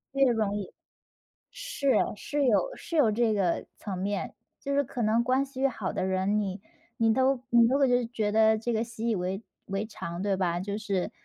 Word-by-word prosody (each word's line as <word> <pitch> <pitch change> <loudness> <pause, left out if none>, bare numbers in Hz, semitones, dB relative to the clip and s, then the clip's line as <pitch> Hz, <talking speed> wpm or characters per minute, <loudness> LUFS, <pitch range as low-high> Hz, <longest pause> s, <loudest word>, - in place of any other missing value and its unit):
越 270 -2 +4
容 215 -3 0
易。 195 -3 -6 0.8
是， 280 - -1 0.2
是 290 +7 -2
有 380 - +2
是 335 - -7
有 260 -8 +4
这 225 0 +2
个 185 -4 0
层 195 -3 -5
面， 200 +1 -3 0.2
就 280 0 -2
是 285 - +3
可 245 -1 -5
能 225 +2 +2
关 260 +2 +2
系 270 0 0
好 220 -7 -3
的 - - -2
人， 190 +2 +1
你 195 -1 -3 0.4
你 225 -1 +3
都 260 0 +2
你 235 -1 +6
都 270 +3 +2
会 245 -3 +3
觉 215 -3 -1
得 220 0 +4
这 235 +2 -2
个 220 +1 +1
习 230 0 -4
以 220 - +2
为 185 +3 -2 0.2
为 195 +2 -2
常， 170 -4 -6
对 195 -2 0
吧？ 175 -2 0
就 200 +2 -3
是， 200 -4 -2
220 Hz, 215 characters per minute, -28 LUFS, 200-250 Hz, 0.8 s, 你